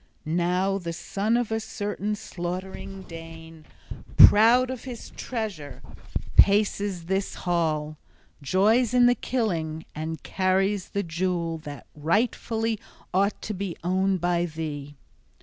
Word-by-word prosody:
Now, 180 +4 +1
the 170 -2 -4
son 205 +7 0
of 240 -2 -1
a 220 - +1
certain 210 -1 -3
slaughtering 190 +1 -6
Dane, 165 -2 -11 0.5
proud 240 +4 +8
of 255 -3 -6
his 245 -3 -8
treasure, 200 - -5 0.5
paces 200 -3 +3
this 195 +2 -1
hall, 155 -3 0 0.4
joys 215 - +3
in 245 -1 +6
the 245 - +6
killing, 170 -11 -2
and 160 +1 -5
carries 190 +1 +1
the 200 - -1
jewel 170 -1 -1
{28d} - - -19
that 145 -1 -8
rightfully 220 +6 0 0.3
ought 200 +3 +2
to 215 - -3
be 190 -3 -4
owned 190 +1 +1
by 175 0 +1
thee! 150 -3 -6
185 Hz, 125 wpm, -26 LUFS, 165-210 Hz, 0.5 s, proud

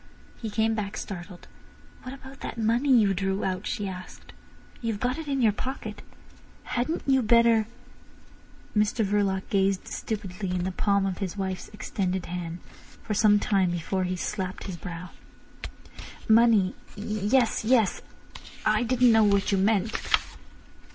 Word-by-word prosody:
He 225 - -3
came 220 +1 +1
back 210 -2 -3
startled. 180 -2 -7 0.5
"What 255 - -7
about 270 0 -13
that - - -6
money 230 +5 +1
you 220 -7 +5
drew 195 +1 -1
out?" 185 +1 -2
she 205 - -2
asked. 185 -1 -9 0.5
"You've 225 -3 -2
got 255 +6 -1
it 320 - -6
in 275 -3 0
your 220 - +5
pocket? 260 +6 -5 0.6
Hadn't 250 +7 -2
you 265 -1 +4
better—" 230 -1 +4 1.1
Mr 210 +1 +2
Verloc 195 -1 +1
gazed 195 -1 +1
stupidly 200 -3 -4
into 180 -1 -1
the 185 - -1
palm 200 +1 +1
of 190 -2 -2
his 195 -1 -4
wife's 190 -2 -3
extended 190 -3 -3
hand 175 -1 -5 0.4
for 215 - -2
some 210 0 +5
time 195 -3 +2
before 175 +2 -1
he 185 +1 -2
slapped 185 +1 -4
his 190 - -5
brow. 170 0 -7 1.2
"Money! 220 -4 +5 0.2
Yes! 215 +4 +1
Yes! 225 -3 +3 0.6
I 215 0 +3
didn't 245 0 +4
know 225 -1 +6
what 200 -1 +2
you 195 - +2
meant." 210 +2 +1
205 Hz, 145 wpm, -27 LUFS, 190-225 Hz, 1.2 s, know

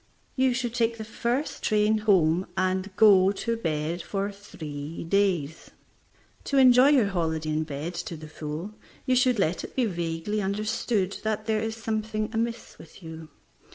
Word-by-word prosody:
You 260 -2 +2
should 245 -2 -2
take 230 -1 0
the 220 - -5
first 240 +6 -2
train 215 0 +2
home 185 -4 +3
and 185 +1 0
go 195 -3 +6
to 230 +3 -2
bed 165 -4 -2
for 195 +3 -3
three 160 -7 -8
days. 170 -4 0 0.8
To 280 - 0
enjoy 255 0 +7
your 265 -8 +4
holiday 160 -4 -1
in 155 +1 0
bed 150 +4 -5 0.2
to 165 - -6
the 155 0 -10
full, 155 +6 -6 0.3
you 255 - +2
should 250 -1 +3
let 180 -3 0
it - - -9
be 255 - +2
vaguely 175 +2 -2
understood 205 0 -1
that 215 0 -2
there 215 -1 0
is 225 0 -3
something 220 -1 -3
amiss 230 +1 -3
with 170 - -14
you. 160 -1 -9
200 Hz, 160 wpm, -26 LUFS, 165-225 Hz, 0.8 s, enjoy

